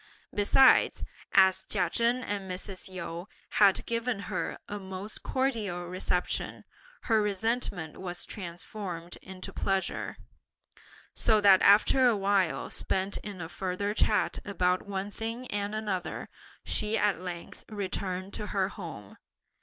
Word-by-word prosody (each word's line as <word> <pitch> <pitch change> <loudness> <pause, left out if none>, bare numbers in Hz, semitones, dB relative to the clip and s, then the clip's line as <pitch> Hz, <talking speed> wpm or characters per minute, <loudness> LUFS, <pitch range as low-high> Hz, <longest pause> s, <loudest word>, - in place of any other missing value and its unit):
Besides, 210 +6 +5 0.3
as 190 0 +5
Chia 185 -4 +1
Chen 240 +2 +2
and 200 -4 -3
Mrs. 185 +1 -5
Yu 170 0 -6 0.3
had 200 -2 +5
given 235 0 -1 0.2
her - - -2
a 205 - -4
most 190 +2 -5
cordial 220 -10 -1
reception, 180 0 -2 0.4
her 220 -2 +3
resentment 205 -5 -1
was 180 -1 -4
transformed 175 -2 -6
into 185 -1 -8
pleasure, 195 -1 -1 1.0
so 220 -2 +3
that 195 -2 +7
after 215 +6 +6
a 230 -3 +3
while 195 -3 +1
spent 190 +1 0
in 200 -4 -7
a 165 - -4
further 185 +3 -2
chat 215 0 +2
about 185 -2 0
one 200 0 -3
thing 230 +4 -4
and 205 +1 -2
another, 205 -5 -3 0.4
she 215 +1 +1
at 205 -4 +1
length 175 -2 -7
returned 195 -2 -3
to 210 - -4
her 195 -2 0
home. 160 - -9
195 Hz, 130 wpm, -29 LUFS, 185-210 Hz, 1.0 s, that